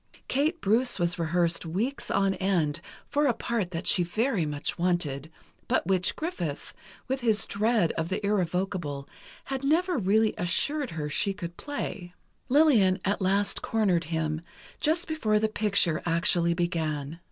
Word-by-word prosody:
Kate 310 +6 +1
Bruce 235 +5 +3
was 175 +1 0
rehearsed 170 +1 +1
weeks 205 +12 -2
on 195 -1 +2
end, 170 -5 0 0.3
for 290 0 +2
a 240 - +2
part 230 -6 -2
that 170 -1 -5
she 180 - +3
very 200 - 0
much 145 +2 -4
wanted, 160 -5 0 0.4
but - - +1
which 185 0 +2
Griffith, 175 - -4 0.3
with 265 +1 -2
his 220 -3 +2
dread 210 -4 +1
of 165 0 -3
the 190 - -1
irrevocable, 180 -7 -1 0.4
had 270 0 -4
never 335 +3 +2
really 215 +2 +3
assured 280 - 0
her 155 -2 -4
she 195 +7 0
could 175 -3 -6
play. 195 -11 -5 0.3
Lillian 245 -10 +5
at 200 +1 0
last 200 +2 +1
cornered 190 -7 +1
him, 160 -1 -2 0.4
just 325 +3 +1
before 225 -10 +1
the 220 +1 +2
picture 200 -7 +1
actually 170 0 +2
began. 160 -3 -2
190 Hz, 150 wpm, -27 LUFS, 170-230 Hz, 0.4 s, Lillian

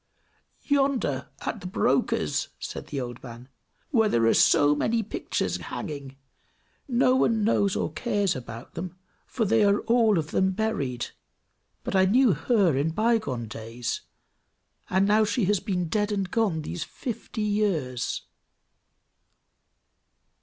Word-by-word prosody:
"Yonder, 270 - 0
at - - -4
the 180 - -5
broker's," 130 - +1
said - - -6
the 140 - -4
old 120 -1 -6
man, 120 0 -10 0.4
"where 225 -6 +3
there 115 - +2
are 115 - +5
so 145 0 +5
many 225 +9 0
pictures 210 - -2
hanging. 140 -8 -6 0.7
No 255 0 +3
one 230 -4 +2
knows 200 -2 +2
or - - -2
cares 205 -7 0
about 120 -2 -8
them, 180 +2 -6 0.3
for 230 - -1
they 220 +1 +3
are 200 0 +3
all 230 -4 +3
of 155 -1 -2
them 190 0 +2
buried; 145 - -2 0.7
but - - -3
I 190 0 +5
knew 235 +2 +4
her 200 - +2
in 140 +4 +1
by 225 +7 +2
gone 125 - -4
days, 115 +2 -5 0.9
and 190 +2 +3
now 215 +1 +4
she 215 0 +1
has 205 0 +2
been 180 -3 -2
dead 210 +5 0
and 195 -3 -2
gone 200 -9 +1
these 85 - -4
fifty 230 -2 -5
years!" 180 - -1
195 Hz, 140 wpm, -26 LUFS, 140-220 Hz, 0.9 s, are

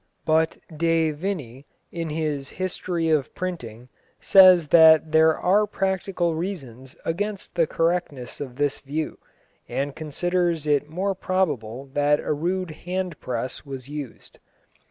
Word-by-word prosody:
But 160 0 +2 0.2
De 165 0 +2
Vinne, 145 - -5 0.3
in 165 -2 -4
his 150 -3 -2
History 180 -2 -2
of 150 -4 0
Printing, 125 - -6 0.3
says 185 -5 +7
that 160 -1 +7
there 160 0 +5
are 205 +4 +3
practical 190 -3 -1
reasons 135 - -6
against 200 +4 -3
the 165 -2 +2
correctness 165 -8 -2
of 130 -3 -6
this 145 0 -1
view, 150 +3 -4 0.5
and 140 +1 -2
considers 170 +1 -1
it 145 0 +1
more 190 +5 -1
probable 145 - -2
that 145 +1 +3
a - - -1
rude 180 +3 -2
hand 180 +1 -4
press 125 0 -4
was 135 -2 -8
used. 145 -5 -8
160 Hz, 130 wpm, -24 LUFS, 145-180 Hz, 0.5 s, says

